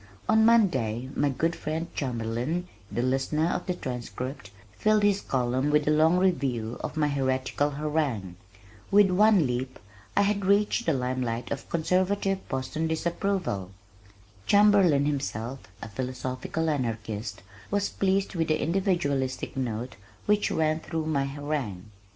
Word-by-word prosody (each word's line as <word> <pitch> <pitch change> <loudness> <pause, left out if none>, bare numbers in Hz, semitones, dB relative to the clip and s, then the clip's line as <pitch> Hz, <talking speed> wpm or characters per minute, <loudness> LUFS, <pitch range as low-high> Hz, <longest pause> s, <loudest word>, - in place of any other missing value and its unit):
On 220 0 +5
Monday 135 - +3
my 145 - +2
good 165 +6 0
friend 160 +2 -3
Chamberlin, 125 +7 -2 0.2
The 120 - -1
Listener 135 +4 +1
of 180 - -3
The 180 - 0
Transcript 125 - -5 0.2
filled 215 - +2
his 205 -1 +3
column 130 +2 0
with 150 0 +2
a - - +4
long 160 +3 +4
review 135 -11 0
of - - -4
my 150 -1 +3
heretical 135 0 0
harangue. 145 - -2 0.5
With 200 -1 +5
one 205 -2 +5
leap 125 +1 -3 0.4
I 200 - +6
had 200 0 0
reached 205 +4 +2
the 165 - +4
lime 130 -1 -1
light 115 -1 -3
of 140 - -4
conservative 185 +3 0
Boston's 150 +4 -2
disapproval! 170 - -1 0.8
Chamberlin, 200 -8 +5
himself 135 -3 -2 0.2
a - - -5
"philosophical 130 +7 -3
anarchist," 110 - -3 0.3
was 200 0 0
pleased 195 0 0
with 165 -3 0
the 155 - +1
individualistic 160 -8 0
note 120 -3 -3 0.3
which 210 0 +2
ran 155 0 +1
through 160 -1 -4
my 145 -3 +1
harangue. 135 -9 -4
145 Hz, 140 wpm, -27 LUFS, 130-180 Hz, 0.8 s, I